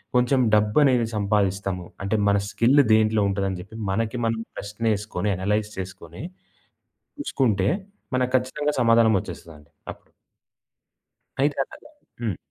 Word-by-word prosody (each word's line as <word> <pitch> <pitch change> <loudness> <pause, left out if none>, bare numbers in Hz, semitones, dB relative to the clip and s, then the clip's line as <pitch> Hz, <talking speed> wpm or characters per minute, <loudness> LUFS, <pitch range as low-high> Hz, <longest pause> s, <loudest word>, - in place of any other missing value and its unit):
కొంచెం 125 +2 +3 0.2
డబ్బనేది 115 +3 +3
సంపాదిస్తాము. 100 -3 0 0.2
అంటే 100 +3 0
మన 100 0 +4
స్కిల్ 125 +7 +3
దేంట్లో 110 0 +3
ఉంటుందని 95 -1 -2
చెప్పి 100 +4 -13 0.2
మనకి 115 +4 -1
మనం 115 0 -1 0.2
ప్రశ్న 105 +3 -7
ఏసుకొని 105 -1 -3
అనలైజ్ 105 +3 -1
చేసుకొని, 90 - -8 1.0
చూసుకుంటే 110 - +1 0.5
మనకు 130 0 +1
ఖచ్చితంగా 145 +4 -1
సమాధానం 115 -1 +5
వచ్చేస్తదండి 75 -5 -11 0.2
అప్పుడు. - - -23 1.3
అయితే 140 +1 +1
అలాగ - - -15 0.4
హ్మ్. 110 -7 -1
105 Hz, 115 wpm, -24 LUFS, 100-120 Hz, 1.3 s, సమాధానం